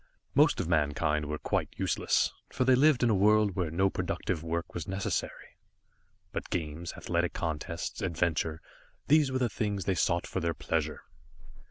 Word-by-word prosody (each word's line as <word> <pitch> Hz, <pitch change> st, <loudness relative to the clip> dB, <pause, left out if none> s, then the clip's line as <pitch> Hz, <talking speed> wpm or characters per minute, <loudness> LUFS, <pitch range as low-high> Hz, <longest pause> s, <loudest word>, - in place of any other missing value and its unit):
Most -, -, +4 dB
of -, -, -1 dB
mankind 75 Hz, -1 st, +1 dB
were 75 Hz, +1 st, -2 dB
quite -, -, -1 dB
useless, -, -, +1 dB, 0.2 s
for 130 Hz, -, 0 dB
they 130 Hz, -, +6 dB
lived 135 Hz, 0 st, +4 dB
in 120 Hz, -, +4 dB
a -, -, +3 dB
world 105 Hz, 0 st, +4 dB
where 90 Hz, -4 st, -1 dB
no 95 Hz, +5 st, +2 dB
productive 80 Hz, -, -2 dB
work 85 Hz, +1 st, -3 dB
was 85 Hz, -3 st, -5 dB
necessary. 95 Hz, +1 st, -3 dB, 0.7 s
But -, -, -5 dB
games, 85 Hz, -2 st, -3 dB
athletic 85 Hz, 0 st, -1 dB
contests, 80 Hz, +4 st, -4 dB
adventure 85 Hz, -3 st, -1 dB, 0.5 s
these 150 Hz, -2 st, +5 dB
were 130 Hz, -, 0 dB
the 125 Hz, -2 st, +2 dB
things 105 Hz, -4 st, -2 dB
they 95 Hz, -, +2 dB
sought 85 Hz, -1 st, +1 dB
for -, -, -3 dB
their 85 Hz, -1 st, -1 dB
pleasure. -, -, -2 dB
85 Hz, 165 wpm, -30 LUFS, 80-105 Hz, 0.7 s, they